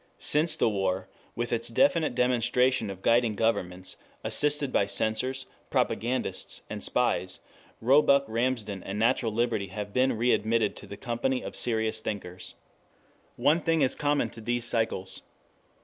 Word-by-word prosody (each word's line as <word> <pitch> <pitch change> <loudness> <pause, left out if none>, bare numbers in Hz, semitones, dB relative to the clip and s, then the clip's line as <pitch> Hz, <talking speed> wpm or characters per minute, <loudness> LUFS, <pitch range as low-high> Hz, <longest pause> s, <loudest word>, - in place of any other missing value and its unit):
Since 155 +3 +2
the - - +2
war, 95 -2 -1 0.3
with 120 +1 -2
its 115 0 0
definite 165 - +2
demonstration 125 -1 +2
of 95 -1 -8
guiding 115 -2 +3
governments, 95 -5 -2 0.3
assisted 145 -2 +2
by 100 - +2
censors, 125 +6 -1 0.2
propagandists, 125 +3 -1
and - - -4
spies, - - 0 0.4
Roebuck 140 +3 +5
Ramsden 110 -4 -2
and 100 +3 -5
Natural 115 +1 +2
Liberty 110 -3 0
have 100 +1 -6
been 130 -2 +2
readmitted 115 -2 +1
to - - -10
the 100 - -8
company 125 +3 -2
of - - -6
serious 110 -2 0
thinkers. 95 -4 -6 0.8
One 155 +4 +3
thing 165 -1 +2
is 130 - +3
common 145 0 0
to 115 - -9
these 120 +1 -1
cycles. 110 -5 -1
115 Hz, 140 wpm, -28 LUFS, 105-130 Hz, 0.8 s, Roebuck